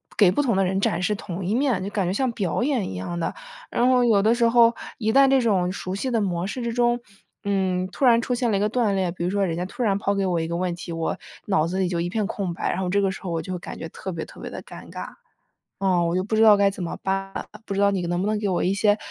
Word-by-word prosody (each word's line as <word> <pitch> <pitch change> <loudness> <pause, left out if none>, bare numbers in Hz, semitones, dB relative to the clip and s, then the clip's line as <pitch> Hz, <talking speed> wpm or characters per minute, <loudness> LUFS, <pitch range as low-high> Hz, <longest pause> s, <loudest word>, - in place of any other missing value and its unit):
给 200 -4 +6
不 290 - +1
同 235 -7 +1
的 195 - +3
人 190 +1 0
展 190 - 0
示 210 +3 +1
同 185 -1 -6
一 200 +6 0
面， 255 -7 +1
就 200 - -3
感 200 -3 -1
觉 185 - 0
像 255 +2 0
表 195 -5 -1
演 255 -5 0
一 - - -6
样 170 - -4
的。 - - -2 0.4
然 245 - +2
后 250 -1 +4
有 210 -4 +4
的 225 +3 +3
时 235 -1 +3
候， 235 0 +5 0.2
一 220 -1 +1
旦 275 +3 +6
这 265 -1 +4
种 185 -6 +2
熟 185 0 -4
悉 255 +6 -2
的 230 -3 +1
模 175 -2 -1
式 230 +6 -4
之 235 -1 -2
中， 240 0 +2 0.4
嗯， 190 -2 0
突 270 - 0
然 235 -1 +6
出 250 - -2
现 240 -1 0
了 200 - +2
一 - - 0
个 210 - +2
断 220 -4 +1
裂， 185 -2 0
比 170 0 -5
如 180 - 0
说 200 0 +1
人 165 -2 -2
家 180 - -2
突 220 - -7
然 200 -3 +2
抛 200 0 0
给 195 - 0
我 180 -2 +1
一 160 - -2
个 170 0 -2
问 180 -1 -1
题， 175 0 -8
我 165 0 -2 0.3
脑 180 -5 +2
子 185 +2 -2
里 185 - +2
就 170 -2 -1
一 175 - -2
片 210 0 -1
空 190 -4 -3
白， - - -2
然 180 - -2
后 180 - -1
这 200 +2 +2
个 195 - +1
时 190 - -8
候 180 - -4
我 165 -1 -1
就 185 - -6
会 180 - -4
感 - - -8
觉 165 - -5
特 190 - -6
别 165 -2 -4
特 - - -14
别 - - -6
的 - - -8
尴 - - -11
尬， - - -6 0.7
嗯， 180 -3 +2
我 170 - -1
就 185 - 0
不 220 - -2
知 220 - +3
道 215 -2 +8
该 200 0 +4
怎 190 -2 -7
么 - - -4
办， 195 0 -2 0.3
不 200 - -3
知 200 - 0
道 200 0 +5
你 195 - -1
能 175 +1 -1
不 - - -1
能 215 0 0
给 205 -2 -1
我 180 - 0
一 185 - +2
些， 205 0 +3
195 Hz, 340 characters per minute, -24 LUFS, 180-225 Hz, 0.7 s, 道